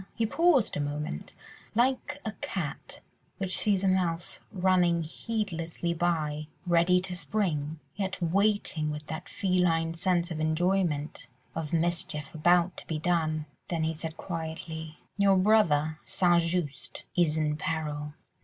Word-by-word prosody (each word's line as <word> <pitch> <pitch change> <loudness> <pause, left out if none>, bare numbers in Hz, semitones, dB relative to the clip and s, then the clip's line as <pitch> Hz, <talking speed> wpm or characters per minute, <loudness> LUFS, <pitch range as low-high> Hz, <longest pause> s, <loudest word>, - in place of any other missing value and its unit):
He 230 - +1
paused 315 -1 +3
a - - -1
moment, 145 - -3 0.4
like 260 +4 +1
a 220 - -1
cat 165 -8 -4 0.4
which 185 -1 +1
sees 200 -2 +2
a - - +3
mouse 175 -3 0
running 180 -3 +3
heedlessly 170 -2 -3
by, 155 -3 0 0.2
ready 175 +1 +4
to 180 -1 -2
spring, 165 -6 -1 0.2
yet 195 -2 -2
waiting 185 -3 +1
with 150 0 -5
that 160 +5 -6
feline 175 -3 +1
sense 175 0 +1
of 160 - -3
enjoyment 160 -3 0 0.3
of 155 -2 -4
mischief 165 -3 -1
about 175 +2 +3
to - - -10
be 160 - -1
done. 155 -2 0 0.2
Then 165 -2 -1
he 160 0 0
said 160 0 -5
quietly— 160 -2 -5 0.2
"Your 200 -1 +5
brother, 165 -7 +3
St. 175 -2 +3
Just, 165 -4 -3
is 160 -3 +3
in 150 -1 +1
peril." 150 -2 -3
170 Hz, 135 wpm, -29 LUFS, 155-185 Hz, 0.4 s, Your